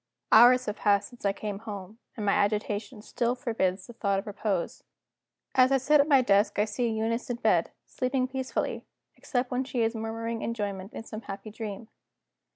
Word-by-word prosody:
Hours 250 Hz, +3 st, +7 dB
have 210 Hz, -, -3 dB
passed 200 Hz, -1 st, +2 dB
since 245 Hz, -4 st, -12 dB
I 200 Hz, -, +4 dB
came 200 Hz, 0 st, -5 dB
home 210 Hz, -1 st, -8 dB, 0.2 s
and 210 Hz, -, -3 dB
my 200 Hz, -, +3 dB
agitation 210 Hz, +1 st, -1 dB
still 240 Hz, +2 st, -1 dB
forbids 195 Hz, -6 st, -1 dB
the 240 Hz, -, -11 dB
thought 200 Hz, -4 st, 0 dB
of 195 Hz, -, -3 dB
repose. 200 Hz, -3 st, -3 dB, 0.7 s
As 255 Hz, 0 st, +5 dB
I 270 Hz, -, +5 dB
sit 290 Hz, +3 st, +4 dB
at 285 Hz, -, 0 dB
my 275 Hz, -4 st, +5 dB
desk 200 Hz, -1 st, +3 dB
I 210 Hz, -, +3 dB
see 230 Hz, +3 st, -1 dB
Eunice 225 Hz, +2 st, -1 dB
in 245 Hz, -, -1 dB
bed, 235 Hz, -, +2 dB, 0.2 s
sleeping 255 Hz, 0 st, -1 dB
peacefully, 260 Hz, 0 st, -3 dB, 0.3 s
except 250 Hz, -2 st, -2 dB
when 250 Hz, +1 st, 0 dB
she 255 Hz, -2 st, -2 dB
is 225 Hz, +1 st, +1 dB
murmuring 225 Hz, 0 st, -4 dB
enjoyment 200 Hz, -3 st, -4 dB
in -, -, -6 dB
some 220 Hz, -1 st, -7 dB
happy 200 Hz, 0 st, -8 dB
dream. 215 Hz, 0 st, -6 dB
225 Hz, 185 wpm, -28 LUFS, 205-245 Hz, 0.7 s, Hours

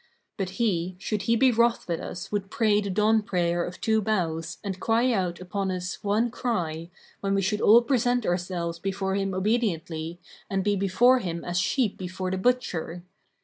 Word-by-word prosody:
But 190 Hz, -2 st, -3 dB
he, 185 Hz, -6 st, 0 dB
should 205 Hz, +2 st, -2 dB
he 230 Hz, -, +5 dB
be 260 Hz, +2 st, +4 dB
wroth 235 Hz, 0 st, +2 dB
with 170 Hz, -2 st, -1 dB
us 185 Hz, +2 st, -7 dB
would 200 Hz, -2 st, -2 dB
pray 210 Hz, -1 st, +2 dB
the 200 Hz, -, -4 dB
dawn 215 Hz, +3 st, +3 dB
prayer 175 Hz, -3 st, 0 dB
of 175 Hz, -, -7 dB
two 220 Hz, -1 st, +2 dB
bows 170 Hz, -6 st, -1 dB
and 195 Hz, -2 st, -4 dB
cry 230 Hz, +5 st, +2 dB
out 180 Hz, -4 st, -1 dB
upon 190 Hz, +2 st, -3 dB
us 180 Hz, +2 st, -4 dB
one 215 Hz, +3 st, +1 dB
cry, 170 Hz, -10 st, -2 dB, 0.3 s
when 195 Hz, 0 st, 0 dB
we 195 Hz, -, +1 dB
should 210 Hz, +3 st, 0 dB
all 235 Hz, +3 st, +7 dB
present 245 Hz, -1 st, +1 dB
ourselves 175 Hz, -1 st, -2 dB
before 195 Hz, +1 st, -2 dB
him 195 Hz, -1 st, -1 dB
obediently 175 Hz, -6 st, -1 dB, 0.3 s
and 195 Hz, -1 st, 0 dB
be 205 Hz, +1 st, +2 dB
before 215 Hz, +7 st, +4 dB
him 170 Hz, -6 st, -4 dB
as 175 Hz, 0 st, -1 dB
sheep 215 Hz, +3 st, 0 dB
before 185 Hz, 0 st, -4 dB
the 190 Hz, -, -1 dB
butcher. 180 Hz, -7 st, -1 dB
195 Hz, 185 wpm, -26 LUFS, 175-220 Hz, 0.3 s, all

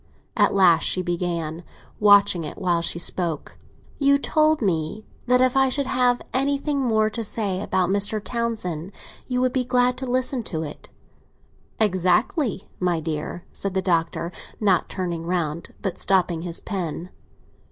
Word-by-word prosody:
At -, -, +3 dB
last 175 Hz, -4 st, +5 dB
she 185 Hz, -, +1 dB
began, 170 Hz, -2 st, -3 dB, 0.4 s
watching 205 Hz, -4 st, +5 dB
it 150 Hz, -, -7 dB
while 175 Hz, -4 st, +1 dB
she 170 Hz, -, 0 dB
spoke. 170 Hz, -3 st, -2 dB, 0.4 s
"You 280 Hz, -1 st, +4 dB
told 310 Hz, +2 st, +2 dB
me 185 Hz, 0 st, -1 dB, 0.2 s
that 250 Hz, +1 st, +4 dB
if 255 Hz, 0 st, +3 dB
I 270 Hz, 0 st, +4 dB
should 280 Hz, +2 st, +1 dB
have 250 Hz, -1 st, +2 dB
anything 280 Hz, +2 st, 0 dB
more 220 Hz, -4 st, +2 dB
to 230 Hz, +1 st, -4 dB
say 200 Hz, -3 st, -2 dB
about 185 Hz, -2 st, 0 dB
Mr. 205 Hz, +2 st, +3 dB
Townsend 205 Hz, -7 st, -3 dB, 0.3 s
you 250 Hz, -1 st, 0 dB
would 255 Hz, -1 st, +1 dB
be 260 Hz, -, +1 dB
glad 250 Hz, 0 st, +2 dB
to 260 Hz, -, -4 dB
listen 255 Hz, +1 st, 0 dB
to 160 Hz, -2 st, -3 dB
it." 150 Hz, -, -9 dB, 0.9 s
"Exactly, 210 Hz, -, +1 dB
my 180 Hz, -2 st, +1 dB
dear," 155 Hz, +2 st, -4 dB
said 195 Hz, -1 st, -4 dB
the 190 Hz, -, +2 dB
Doctor, 170 Hz, -1 st, 0 dB, 0.3 s
not 195 Hz, -5 st, +2 dB
turning 170 Hz, -3 st, -4 dB
round, 170 Hz, -2 st, -2 dB
but 195 Hz, -4 st, -3 dB
stopping 180 Hz, -4 st, +2 dB
his 170 Hz, -1 st, -5 dB
pen. 180 Hz, -3 st, -4 dB
195 Hz, 150 wpm, -23 LUFS, 170-250 Hz, 0.9 s, last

